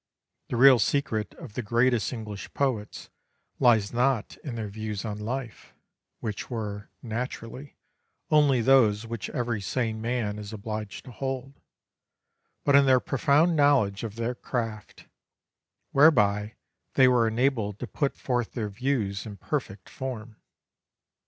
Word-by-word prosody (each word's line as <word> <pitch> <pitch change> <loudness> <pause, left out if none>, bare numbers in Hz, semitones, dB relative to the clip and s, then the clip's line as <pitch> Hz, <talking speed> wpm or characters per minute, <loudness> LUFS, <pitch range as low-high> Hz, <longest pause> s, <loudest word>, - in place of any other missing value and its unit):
The - - -2
real 130 0 +7
secret 110 -2 0
of 150 -11 -11
the 125 - -3
greatest 120 +1 +2
English 105 -4 -7
poets 125 -7 -2 0.5
lies 115 -5 +4
not 125 -2 +1
in 135 -6 -7
their 110 -2 -4
views 105 0 -5
on 105 -1 -4
life, 120 +1 -6 0.5
which 105 -3 -4
were, 105 -4 -5
naturally, 125 +3 -6 0.5
only 145 -5 +4
those 115 -4 +4
which 115 -2 -5
every 120 -4 -2
sane 110 +1 -2
man 115 -3 -2
is 105 0 -7
obliged 110 -1 -6
to 125 - -10
hold, 135 +2 -5 1.0
but 140 - +4
in 140 -1 +6
their 130 -1 +6
profound 150 +6 +2
knowledge 135 -10 +3
of 110 -2 -5
their 115 +1 -2
craft, 115 -4 -5 0.9
whereby 105 -8 +4 0.4
they 130 - +7
were 120 -2 +4
enabled 110 -3 0
to 125 - -5
put 140 +3 -2
forth 120 -3 -2
their 110 -4 -3
views 105 -3 -2
in 105 -2 -8
perfect 105 -10 -4
form. 120 -4 -6
115 Hz, 135 wpm, -27 LUFS, 105-130 Hz, 1.0 s, real